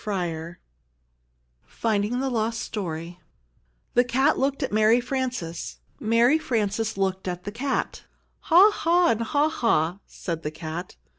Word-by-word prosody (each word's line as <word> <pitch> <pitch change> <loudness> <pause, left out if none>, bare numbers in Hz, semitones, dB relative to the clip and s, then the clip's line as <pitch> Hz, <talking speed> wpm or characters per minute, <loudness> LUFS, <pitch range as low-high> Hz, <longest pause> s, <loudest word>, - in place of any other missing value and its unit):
VII 170 -5 -3 1.1
FINDING 220 +2 -1
THE 270 -1 -1
LOST 225 -1 -1
STORY 175 -5 -5 0.7
THE 245 - +5
cat 265 +5 +2
looked 275 +1 0
at - - -2
Mary 215 +3 +4
Frances. 250 -10 -4 0.2
Mary 235 +7 +3
Frances 220 -6 -1
looked 190 -1 -1
at 180 0 -4
the 205 - -5
cat. 265 +6 -3 0.4
"Ha, 370 +6 +8
ha, 345 -1 +3
and 230 - -1
ha, 285 +6 +2
ha!" 195 - +1
said 165 -3 -5
the 150 - -3
cat. 160 +3 -7
220 Hz, 135 wpm, -25 LUFS, 180-255 Hz, 1.1 s, Ha